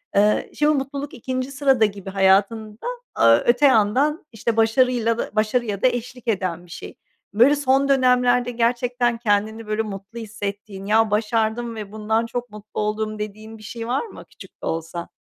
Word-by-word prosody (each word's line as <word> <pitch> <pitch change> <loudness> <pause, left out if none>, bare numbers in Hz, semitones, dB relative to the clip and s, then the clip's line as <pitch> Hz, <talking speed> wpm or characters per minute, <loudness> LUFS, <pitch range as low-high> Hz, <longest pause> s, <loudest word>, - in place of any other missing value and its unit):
Iıı, 210 +1 +3
şimdi 300 +1 +2
mutluluk 275 +1 -4
2'nci 255 +1 -4
sırada 270 -5 +3
gibi 200 -2 -5
hayatında, 200 - +1 0.3
aaa, 115 0 +6
öte 240 +4 +4
yandan, 265 +6 +3
işte, 225 0 -2
başarıyla 230 0 +2
da - - -3
başarıya 215 -1 0
da - - +5
eşlik 250 0 -4
eden 185 -5 -2
bir 175 - -17
şey. - - -9 0.4
Böyle, 245 +8 +5
son 275 -1 +2
dönemlerde 250 -2 +3
gerçekten 240 0 0
kendini, 220 0 -1
böyle, 215 +1 0
mutlu 210 +2 -7
hissettiğin, 205 -2 -6
"Ya, 220 +1 +3
başardım 225 +2 0
ve 210 -2 -7
bundan 220 +1 -1
çok 245 +1 -5
mutlu 210 0 -7
oldum." 215 0 -2
dediğin 215 +1 -7
bir 215 - -15
şey 230 +2 -6
var 255 - -1
mı 450 - -12
küçük - - -15
de - - -6
olsa? 165 +1 -4
225 Hz, 165 wpm, -22 LUFS, 210-245 Hz, 0.4 s, aaa